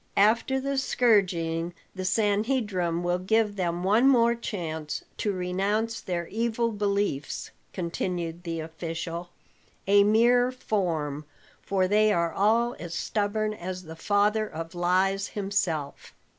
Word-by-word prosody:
"After 230 +6 +3
the 275 0 -1
scourging, 175 -9 +1 0.2
the 185 -1 -5
Sanhedrim 205 -4 +1
will 175 +1 0
give 210 +2 +1
them 175 -2 -2
one 215 +7 +4
more 235 -3 +5
chance 160 -10 -4
to 210 - 0
renounce 200 +5 -1
their 175 -2 -3
evil 230 +2 0
beliefs," 200 -8 -2 0.2
continued 170 -1 -3
the 165 -2 -4
official, 165 +1 -5 0.6
"a 200 +1 +6
mere 240 +4 +4
form, 165 - -2 0.4
for 190 -2 +1
they 215 +2 +4
are 170 -4 +1
all 230 +4 +2
as 170 -1 -6
stubborn 215 +2 -1
as 185 -2 -6
the 160 -1 -9
father 210 +4 +1
of 165 +2 -7
lies 190 +3 +1
himself. 195 -8 -3
195 Hz, 125 wpm, -27 LUFS, 170-215 Hz, 0.6 s, a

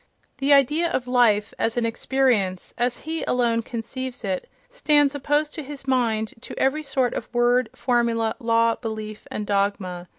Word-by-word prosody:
The 275 +1 +1
idea 295 +5 +4
of 260 -7 -1
"life" 225 -4 +3
as 225 +1 0
an 240 - +1
experience, 230 -6 0
as 245 0 -1
he 320 +1 -4
alone 235 -2 +2
conceives 245 +2 -6
it, 190 -2 -3 0.2
stands 300 - +3
opposed 295 +2 0
to 315 - -5
his 275 0 -9
mind 225 -4 +1
to - - -9
every 270 +4 +1
sort 265 -4 0
of - - -5
word, 240 0 +2
formula, 235 -3 +1
law, 230 -1 +3
belief 215 -2 -6
and 210 - -4
dogma. 200 -3 -1
240 Hz, 160 wpm, -24 LUFS, 220-270 Hz, 0.2 s, idea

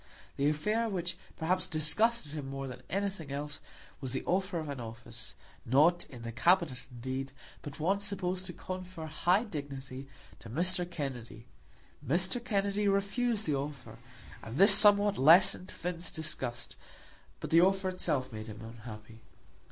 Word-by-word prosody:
The 140 +1 +2
affair 210 +10 0
which 180 -3 -2 0.2
perhaps 180 +3 +1
disgusted 160 +5 +1
him 150 -3 -5
more 135 0 -4
than 125 -1 -8
anything 195 -6 -2
else 145 +1 -4 0.4
was 130 -3 -4
the 130 - -2
offer 185 0 0
of 155 -2 -4
an 140 -2 -5
office, 115 -1 -8 0.3
not 155 +8 +4
in 120 -3 -11
the 115 - -4
Cabinet, 165 +1 +3
indeed, 130 +2 -4 0.3
but 145 0 -9
one 190 +6 +2
supposed 190 -2 -3
to 175 - -6
confer 185 -2 -6
high 175 +6 +2
dignity, 140 - -7 0.3
to 115 - -11
Mr. 175 +6 0
Kennedy. 125 -8 -6 0.6
Mr. 180 - 0
Kennedy 200 -2 0
refused 200 +3 +1
the 150 - 0
offer, 140 0 -5 0.4
and 115 +4 -7
this 200 +2 +9
somewhat 205 0 +6
lessened 175 +5 +6
Finn's 175 0 -4
disgust, 125 -6 -4 0.6
but - - -6
the 165 +1 +7
offer 190 +1 +3
itself 135 -9 -1
made 110 0 -6
him 110 0 -9
unhappy. 115 -1 -10
160 Hz, 150 wpm, -31 LUFS, 135-190 Hz, 0.6 s, this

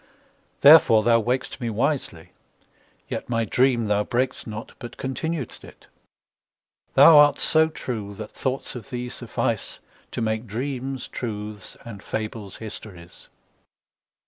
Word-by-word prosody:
Therefore 140 -7 +8
thou 115 0 +4
waked'st 125 +3 -2
me 120 - -2
wisely; 115 - -2 0.8
yetMy 115 -2 -2
dream 125 0 +2
thou 105 0 +1
brak'st 125 +3 -2
not, 110 0 -7
but 120 - -9
continued'st 135 +1 -4
it:Thou 165 -2 0
art 145 -1 +6
so 160 0 +3
true 110 -9 -6
that 105 +1 -8
thoughts 130 0 -3
of 125 +1 -9
thee 125 -1 -4
sufficeTo 120 - -4
make 110 +1 -2
dreams 130 +3 -4
truths 105 -3 -6
and 105 -4 -9
fables 105 -3 -5
histories. 100 -5 -10
120 Hz, 115 wpm, -24 LUFS, 110-130 Hz, 0.8 s, Therefore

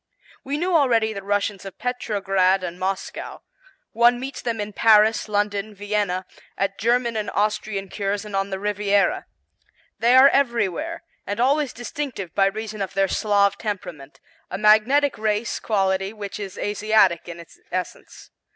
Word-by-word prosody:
We 280 +2 -3
knew 355 +2 0
already 230 -7 +3
the 200 - -6
Russians 200 0 -1
of 195 -1 -9
Petrograd 195 -6 0
and 175 0 -5
Moscow; 190 +1 -4 0.5
one 240 +1 +4
meets 265 +2 -6
them 230 -2 -3
in 210 0 -4
Paris, 220 0 +4
London, 205 0 -1
Vienna, 200 -2 -2 0.3
at 195 0 -2
German 235 +1 +1
and 215 -1 -2
Austrian 210 -1 -1
Cures 200 +2 -3
and 210 -2 -6
on 195 0 0
the 190 - -3
Riviera. 205 0 0 0.7
They 240 +2 +4
are 265 +2 +9
everywhere 275 - 0 0.2
and 205 +2 -3
always 275 +2 +2
distinctive 245 - -6
by 195 -1 +3
reason 215 +1 -5
of 190 - -4
their 195 0 +3
Slav 200 0 +1
temperament; 175 -10 -6 0.3
a - - -4
magnetic 220 +7 +4
race 215 +1 -1
quality 195 -1 0
which 205 -1 -7
is 195 -2 -7
Asiatic 205 -5 +2
in 170 0 -8
its 170 - -14
essence. 185 0 -6
210 Hz, 150 wpm, -23 LUFS, 195-230 Hz, 0.7 s, are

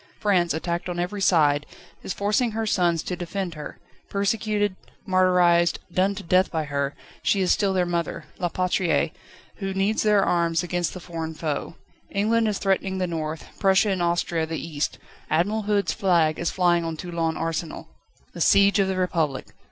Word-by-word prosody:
France, 180 -5 +2
attacked 170 +2 -2
on 175 - -4
every 185 +3 -3
side, 150 -6 +4 0.4
is - - -5
forcing 210 +5 0
her 225 0 -1
sons 175 -5 +1
to 180 - -3
defend 180 +1 -4
her: 150 -1 -8 0.3
persecuted, 205 0 0 0.3
martyrised, 180 -2 +4 0.2
done 195 +2 +2
to 200 - -7
death 185 +2 +3
by 160 -2 -1
her, 140 -1 -2 0.3
she 200 - +2
is 185 -1 +2
still 200 -2 +2
their 185 -1 +1
Mother: 170 -2 -3
La 175 - 0
Patrie, 180 0 0 0.4
who 195 -2 -4
needs 195 +3 +1
their 210 -2 +4
arms 170 -1 +1
against 175 0 -2
the - - -6
foreign 165 -2 -6
foe. 155 0 -3 0.3
England 220 +3 +1
is 210 -2 0
threatening 195 -1 0
the 185 - 0
north, 160 -2 -4
Prussia 195 +1 +4
and 185 -2 -1
Austria 170 -1 0
the 160 0 -3
east. 155 -2 -3 0.3
Admiral 200 +8 +1
Hood's 205 -1 +2
flag 170 -7 +2
is 170 - 0
flying 175 -2 +2
on 165 -1 -4
Toulon 165 -2 -2
Arsenal. 165 0 -3 0.5
The - - -7
siege 200 +1 +5
of 195 - +3
the 190 -1 -1
Republic! 165 -7 -1
180 Hz, 175 wpm, -24 LUFS, 165-195 Hz, 0.5 s, siege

